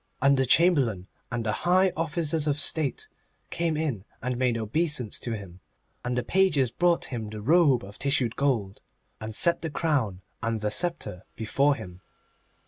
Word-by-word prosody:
And 140 +1 +4
the 130 -1 +1
Chamberlain 130 - +3 0.3
and 120 -1 -3
the 110 - +1
high 185 - +2
officers 160 -1 0
of 145 0 0
State 155 - +1 0.4
came 165 -2 -1
in 140 -11 -2 0.2
and 125 0 -3
made 125 -1 +1
obeisance 125 +1 0
to 120 - -4
him, 95 -3 -11 0.4
and 125 0 -2
the 125 - 0
pages 150 -6 +2
brought 170 +6 +2
him 115 -3 -4
the 105 0 -7
robe 140 - +3
of 100 +1 -12
tissued 135 -4 +1
gold, 115 -9 -1 0.4
and 110 0 -6
set 170 +7 +2
the 160 - -3
crown 135 - -1 0.2
and 115 0 -1
the 105 0 -2
sceptre 170 - 0
before 140 +6 +1
him. 90 -7 -10
130 Hz, 165 wpm, -26 LUFS, 110-160 Hz, 0.4 s, And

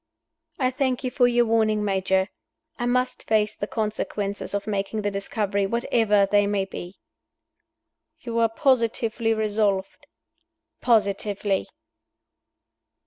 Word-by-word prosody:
"I 255 -2 +1
thank 260 -1 -1
you 255 - -2
for 245 -1 +4
your 240 0 +3
warning, 215 -2 +2
Major. 190 -1 +1 0.5
I 240 - -1
must 250 +1 0
face 215 -1 +2
the 205 - -4
consequences 210 -2 -3
of 200 - -2
making 205 +1 -2
the 205 - 0
discovery, 200 0 -1
whatever 220 -2 +2
they 205 +1 +3
may 200 -1 0
be." 180 -1 -8 1.2
"You 230 -1 -2
are 230 -1 +4
positively 230 -2 +1
resolved?" 210 +3 -1 0.7
"Positively." 205 -3 +1
215 Hz, 115 wpm, -24 LUFS, 200-235 Hz, 1.2 s, for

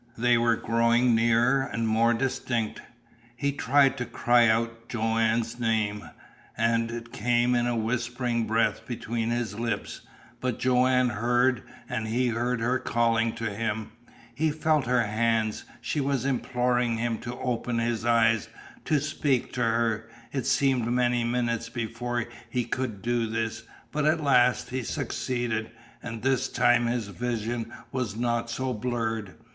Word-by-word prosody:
They 120 +1 +4
were 115 0 +3
growing 115 +2 +2
nearer 120 +4 +3
and 115 -3 -2
more 115 +2 +3
distinct. 120 -3 -2 0.5
He 140 +3 0
tried 140 0 +3
to 125 - -1
cry 120 0 +3
out 115 +1 0
Joanne's 115 +1 0
name, 110 -3 -1 0.5
and 115 0 +2
it 115 0 -7
came 120 +2 +2
in 120 0 +2
a 120 - 0
whispering 120 0 -1
breath 115 +1 +1
between 115 -1 -3
his 120 -3 -2
lips. 115 -3 -3 0.4
But 125 -2 -2
Joanne 125 0 +3
heard; 120 +1 +2 0.3
and 110 0 -3
he 120 +3 +1
heard 120 +1 -1
her 125 +3 +1
calling 115 -1 +1
to 115 -2 -3
him; 110 0 -3 0.4
he 155 +6 +1
felt 155 -3 +1
her 125 -1 +3
hands; 110 0 0 0.2
she 150 - -1
was 135 -2 0
imploring 125 -2 0
him 115 0 -1
to 120 +1 -6
open 120 -1 -2
his 115 -1 -1
eyes, 115 -2 +3 0.4
to 150 - +2
speak 145 -3 -1
to 125 - -2
her. 115 -1 0 0.2
It 135 -3 -2
seemed 130 -4 +2
many 120 0 +2
minutes 120 -1 -1
before 120 0 -3 0.2
he 125 -2 -1
could 120 -4 -3
do 120 -1 0
this, 115 0 -2 0.3
but 150 0 -1
at 155 +2 +3
last 125 -4 +3
he 130 +1 -1
succeeded. 120 -4 -2 0.3
And 115 -2 -7
this 130 -1 +2
time 120 0 +3
his 120 -3 -2
vision 115 0 -3 0.2
was 125 -6 -2
not 120 0 -1
so 130 +2 -2
blurred. 110 -3 -3
120 Hz, 150 wpm, -27 LUFS, 115-125 Hz, 0.5 s, They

